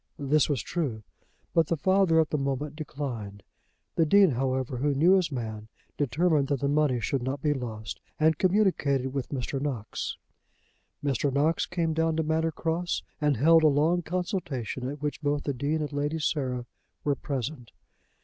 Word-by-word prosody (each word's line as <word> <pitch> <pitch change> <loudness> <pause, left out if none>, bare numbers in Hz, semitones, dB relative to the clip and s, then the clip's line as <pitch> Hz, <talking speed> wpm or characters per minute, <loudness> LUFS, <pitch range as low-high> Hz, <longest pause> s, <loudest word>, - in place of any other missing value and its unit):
This 145 +2 +2
was 140 -5 0
true, 135 -11 -3 0.5
but 165 -2 +3
the 165 - 0
father 185 +1 +3
at 160 - +2
the 150 - +1
moment 140 +2 -2
declined. 120 -10 -5 0.5
The 165 - +3
Dean, 195 0 +6
however, 130 0 -1
who 140 +2 +1
knew 165 +7 +5
his 180 -4 +2
man, 110 -4 -5 0.3
determined 150 +1 +2
that 140 -2 -1
the 140 - +1
money 145 -3 +2
should 135 +3 -1
not 130 +3 -3
be 150 -1 +3
lost, 110 -5 -6 0.2
and 160 +1 +4
communicated 175 -10 +2
with 135 -3 -3
Mr. 135 0 -3
Knox. 130 -7 -3 0.9
Mr. 140 0 +1
Knox 150 +4 +1
came 165 -2 -1
down 160 0 +1
to 160 - +1
Manor 160 +1 +1
Cross 170 +2 -2 0.2
and 145 -3 +2
held 165 +6 +6
a 155 - +6
long 155 +5 +3
consultation 160 - -3
at 145 +1 -7
which 150 +1 -2
both 145 -1 0
the 140 - -1
Dean 145 +5 -1
and 150 -1 -4
Lady 145 +2 -1
Sarah 130 -5 -1 0.4
were 145 - +2
present. 135 -3 -4
145 Hz, 170 wpm, -28 LUFS, 130-160 Hz, 0.9 s, Dean